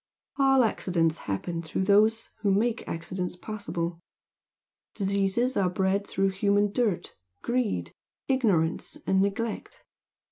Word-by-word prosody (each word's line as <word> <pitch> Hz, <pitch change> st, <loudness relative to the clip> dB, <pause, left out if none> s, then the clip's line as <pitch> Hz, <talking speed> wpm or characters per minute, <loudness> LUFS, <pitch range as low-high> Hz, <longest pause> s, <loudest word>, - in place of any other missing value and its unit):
All 270 Hz, -1 st, +5 dB
accidents 170 Hz, -7 st, +1 dB
happen 165 Hz, -, -2 dB
through 170 Hz, +3 st, -2 dB
those 215 Hz, +3 st, +3 dB
who 210 Hz, -2 st, +1 dB
make 225 Hz, +4 st, +1 dB
accidents 180 Hz, +2 st, -4 dB
possible, 175 Hz, -4 st, -4 dB, 1.0 s
diseases 200 Hz, +5 st, +1 dB
are 190 Hz, -2 st, +2 dB
bred 190 Hz, +2 st, 0 dB
through 195 Hz, 0 st, +1 dB
human 200 Hz, +1 st, +2 dB
dirt, 215 Hz, -5 st, -1 dB, 0.3 s
greed, 240 Hz, -2 st, -1 dB, 0.3 s
ignorance, 205 Hz, -12 st, +1 dB
and 190 Hz, 0 st, +3 dB
neglect. 200 Hz, +3 st, -3 dB
200 Hz, 110 wpm, -27 LUFS, 180-220 Hz, 1.0 s, All